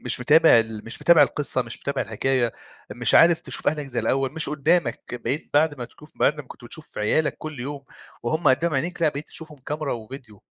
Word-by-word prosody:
مش - - -2
متابع 155 +1 +6
ال 110 -1 -3
مش 115 - -5
متابع 170 -3 +7
القصة، 140 -1 0
مش 120 - -9
متابع 140 -1 -2
الحكاية، 120 +2 0 0.4
مش - - 0
عارف 170 0 +6
تشوف - - 0
أهلك 150 -2 -2
زي 125 -3 -3
الأول، 135 -1 0
مش 160 -1 0
قدّامك. 150 -3 0 0.2
بقيت 145 - -2
بعد 145 -1 +2
ما 120 - -4
تكوف 150 +5 -16
بعد 150 - +2
ما 150 - -6
كنت 125 - -14
بتشوف 155 +6 -6
عيالك 150 +9 +1
كل 155 -4 -7
يوم 140 +2 -6 0.4
وهُم 155 +7 +1
قدّام 155 +5 +2
عينيك 170 +6 -2
لأ، 160 - +5
بقيت 145 +1 -5
تشوفهم 155 -2 -8
كاميرا 150 +2 -4
وفيديو. 115 -2 -10
140 Hz, 205 wpm, -23 LUFS, 125-155 Hz, 0.4 s, متابع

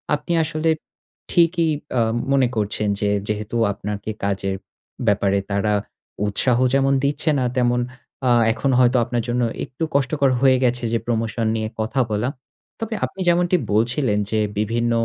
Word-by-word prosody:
আপনি 150 +3 -6
আসলে 155 +1 -1 0.6
ঠিকই 170 -1 +3 0.3
আ - - +4 0.3
মনে 135 -2 +4
করছেন 105 0 -1
যে 105 - +1 0.2
যেহেতু 105 +2 -3 0.2
আপনার 105 +1 -4 0.3
কাজের 95 -1 -1 0.5
ব্যাপারে 100 -1 +2
তারা 105 +1 +1 0.5
উৎসাহ 120 +4 +2 0.2
যেমন 135 0 +3
দিচ্ছে 145 +3 0
না 130 - +1
তেমন 120 -1 +2 0.5
আ - - +4 0.2
এখন 130 +4 -1
হয়তো 125 0 +4
আপনার 120 -1 -2
জন্য 125 +1 +1 0.2
একটু 130 +5 -6
কষ্টকর 140 0 +2
হয়ে 130 -1 +5
গেছে 125 0 +1
যে 115 - +2
প্রমোশন 115 0 -1
নিয়ে 110 -1 -2
কথা 110 +5 0
বলা। 105 +4 0 0.5
তবে 225 0 -3
আপনি - - -11
যেমনটি 175 +1 +3 0.2
বলছিলেন 115 0 +1
যে 110 - +1 0.2
বিভিন্ন 115 +3 0
120 Hz, 150 wpm, -21 LUFS, 105-140 Hz, 0.6 s, হয়ে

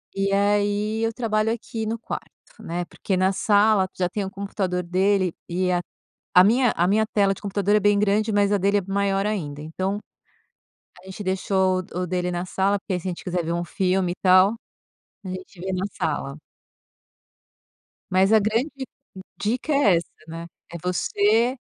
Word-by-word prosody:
E 195 0 0
aí, 205 +2 +1
eu 225 - +1
trabalho 220 -2 0
aqui 225 -1 -4
no 225 +1 -2
quarto, - - -6 0.3
né, 175 +1 -3
porque 190 +2 -3
na 185 +1 +3
sala 205 -1 +3
tu - - -40
já 180 -1 +1
tem 200 +3 -3
o 190 - -4
computador 190 -2 -3
dele 185 0 +1 0.2
e 180 +1 0
a 175 0 +1 0.6
a 180 - +10
minha 240 +4 +4
a 175 - +2
minha 215 +3 +3
tela 200 -2 +2
de - - -14
computador 200 0 +1
é - - +5
bem 205 0 +3
grande, 210 +2 +2
mas 205 0 +3
a 205 - +3
dele 200 +2 +2
é - - -5
maior 195 0 0
ainda 150 -9 -3
então 190 +6 -3 1.0
a - - -21
gente 190 +2 -8
deixou 190 0 +1
o 180 - -2
o 180 - -2
dele 180 0 -1
na 175 0 -2
sala 195 +2 +1
porque 190 - -4
aí 180 - -2
se 180 - -9
a - - 0
gente 175 - -7
quiser 180 -2 -2
ver 170 - -2
filme 185 0 0
e - - -5
tal, 185 +3 +6 0.7
a - - -6
gente 185 0 -8
vê 190 +1 -3
na 185 +2 -1
sala. 140 -2 -2 1.8
Mas 190 +3 +4
a 220 - +7
grande 225 +8 0 0.7
dica 245 +8 -1
é 205 -11 +4
essa, 170 - -4 0.2
né, 165 +1 -7 0.2
é 170 - -5
você, 210 +6 +2
195 Hz, 190 wpm, -24 LUFS, 180-210 Hz, 1.8 s, a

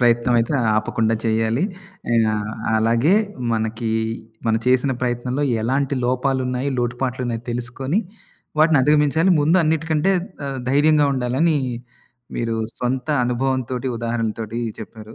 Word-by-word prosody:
ప్రయత్నం 120 0 +3
అయితే 115 +5 0 0.2
ఆపకుండా 110 +1 +1
చేయాలి, 115 +5 +1 0.5
ఆహ్, 110 -2 +1 0.3
అలాగే 115 - +3 0.4
మనకి 110 +1 -2 0.6
మనం 110 0 +3
చేసిన 130 +1 +3
ప్రయత్నంలో 125 +3 -1 0.2
ఎలాంటి 135 +3 0
లోపాలున్నాయి, 130 +1 0
లోటుపాట్లున్నాయి 120 -1 -2
తెలుసుకొని, 130 - -2 0.6
వాటిని 155 -2 +5
అధిగమించాలి. 150 +5 +3
ముందు 160 +5 +3
అన్నిటికంటే 160 +3 +1 0.3
ఆహ్, 135 -1 -4
ధైర్యంగా 150 +1 +4
ఉండాలని 135 +6 +1 0.8
మీరు 115 -1 -1 0.2
సొంత 125 +2 -2 0.2
అనుభవం 130 +2 0
తోటి, 130 +1 -2
ఉదాహరణలతోటి 115 -1 -3 0.2
చెప్పారు. 110 +1 -10
125 Hz, 105 wpm, -21 LUFS, 115-140 Hz, 0.8 s, వాటిని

